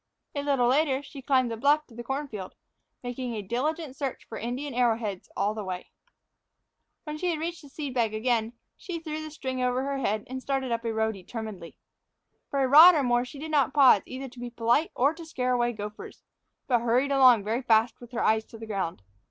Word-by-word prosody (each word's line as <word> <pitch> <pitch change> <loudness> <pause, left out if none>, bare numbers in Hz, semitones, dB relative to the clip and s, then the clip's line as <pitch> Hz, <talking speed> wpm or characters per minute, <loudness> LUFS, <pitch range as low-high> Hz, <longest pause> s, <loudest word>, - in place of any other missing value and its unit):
A 285 - -2
little 280 -4 +2
later 275 +1 +2
she 275 0 -10
climbed 255 -2 +2
the 225 - -4
bluff 290 +5 +3
to 245 - -19
the 240 +1 -7
corn 275 +4 -3
field, 205 -7 -8 0.5
making 245 -1 -4
a 210 - -4
diligent 270 - -2
search 275 -3 -4
for 220 - -7
Indian 250 +5 -4
arrowheads 225 -5 0
all 200 +2 +1
the 215 -1 -5
way. 185 -1 -6 1.1
When 305 0 -6
she 350 -2 0
reached 330 +1 -4
the 290 - -14
seed 285 -2 -5
bag 230 -4 +1
again, 225 +1 0 0.2
she 355 -3 -6
threw 310 -1 -5
the 310 - -6
string 260 -4 -4
over 250 +1 +1
her 275 0 -2
head 215 -4 -1
and 260 +1 -6
started 265 -2 -2
up 230 0 -1
a 230 - 0
row 220 0 +1
determinedly. 200 -2 -8 0.7
For 275 -1 +1
a - - +2
rod 320 +6 +9
or 290 - +2
more 245 0 +2
she 255 - -11
did 310 +3 -6
not 285 -2 +2
pause 260 -8 +7
either 265 +1 -6
to 245 - -14
be 245 0 -5
polite 240 +6 +1
or 280 +5 +3
to 335 +1 -10
scare 255 -6 -1
away 240 -1 +1
gophers, 210 -1 -8 0.4
but 245 -3 +2
hurried 245 +4 +2
along 255 -6 +6
very 225 +5 -1
fast, 225 -1 +2
with 240 0 -12
her 240 - -1
eyes 220 0 +2
to 225 - -12
the 225 - -8
ground. 190 - -3
250 Hz, 220 wpm, -27 LUFS, 225-280 Hz, 1.1 s, rod